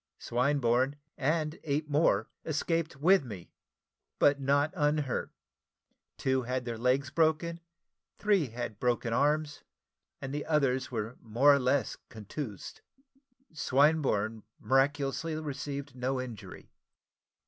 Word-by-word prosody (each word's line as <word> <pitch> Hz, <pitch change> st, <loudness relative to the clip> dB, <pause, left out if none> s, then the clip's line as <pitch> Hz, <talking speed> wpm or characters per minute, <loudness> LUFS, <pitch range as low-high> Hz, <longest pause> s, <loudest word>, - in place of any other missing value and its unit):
Swinburne, 130 Hz, +1 st, +1 dB, 0.2 s
and 155 Hz, +2 st, -1 dB
eight 150 Hz, 0 st, -1 dB
more, 150 Hz, +2 st, +2 dB, 0.2 s
escaped 165 Hz, +1 st, -1 dB
with 175 Hz, +5 st, +4 dB
me, 100 Hz, -8 st, -9 dB, 0.7 s
but 140 Hz, 0 st, +4 dB
not 140 Hz, +3 st, +2 dB
unhurt: 150 Hz, -4 st, 0 dB, 0.9 s
two 130 Hz, 0 st, +1 dB
had 125 Hz, +1 st, -3 dB
their 115 Hz, -2 st, -4 dB
legs 130 Hz, +3 st, +1 dB
broken, 165 Hz, +1 st, +1 dB, 0.6 s
three 200 Hz, -7 st, +2 dB
had 115 Hz, -2 st, -6 dB
broken 120 Hz, -1 st, 0 dB
arms, 145 Hz, +3 st, +1 dB, 0.6 s
and 135 Hz, +1 st, -6 dB
the 145 Hz, 0 st, -4 dB
others 135 Hz, -4 st, +1 dB
were 115 Hz, 0 st, -4 dB
more 120 Hz, +6 st, +4 dB
or 140 Hz, -, +3 dB
less 130 Hz, +1 st, +1 dB
contused. 110 Hz, 0 st, -7 dB, 0.7 s
Swinburne 135 Hz, -7 st, +2 dB, 0.2 s
miraculously 140 Hz, +4 st, +1 dB
received 140 Hz, -2 st, -5 dB
no 130 Hz, +1 st, -1 dB
injury. 120 Hz, -6 st, -8 dB
140 Hz, 110 wpm, -30 LUFS, 125-150 Hz, 0.9 s, with